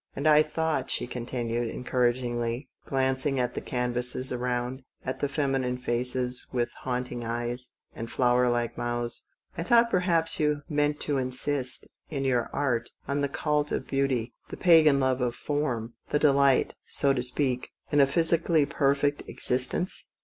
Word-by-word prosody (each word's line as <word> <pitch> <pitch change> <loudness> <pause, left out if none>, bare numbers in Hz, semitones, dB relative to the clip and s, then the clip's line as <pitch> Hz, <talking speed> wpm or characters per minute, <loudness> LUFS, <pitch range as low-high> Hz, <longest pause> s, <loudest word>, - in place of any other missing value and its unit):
And 140 - -4
I 150 0 +7
thought," 160 +1 -1
she - - +1
continued 120 -1 -3
encouragingly, 120 0 -1 0.2
glanc 130 -1 +1
ing 135 -3 0
at 125 -1 0
the - - -4
canvases 125 +1 -1
around, 125 +1 -2 0.2
at 130 - -3
the 145 - -1
feminine 135 -4 0
faces 125 0 0
with 120 -2 -1
haunting 125 -1 -3
eyes 120 +2 -2 0.2
and 115 0 -6
flower 125 0 +3
like 120 -1 -1
mouths, 120 0 -3 0.3
"I 170 - -3
thought 235 +6 +4
perhaps 170 -3 +2
you 150 -1 +1
meant 150 -2 0
to 145 -2 0
insist, 130 +1 -1 0.2
in 140 -3 -3
your 125 -3 +1
art, 125 -5 -1 0.2
on 140 +1 0
the 140 - 0
cult 150 +1 0
of - - -2
beauty, 130 -4 -1 0.2
the - - -7
Pagan 160 -5 +6
love 130 -1 +1
of 120 -1 0
fonn, 125 -6 -2 0.2
the - - +2
delight, 140 -2 +3
so 140 -1 +3
to 125 - -1
speak, 125 0 0 0.2
in 145 - +3
a 135 - +5
physically 165 0 +3
perfect 145 0 +1
existence?" 130 +8 0
130 Hz, 155 wpm, -27 LUFS, 125-145 Hz, 0.3 s, I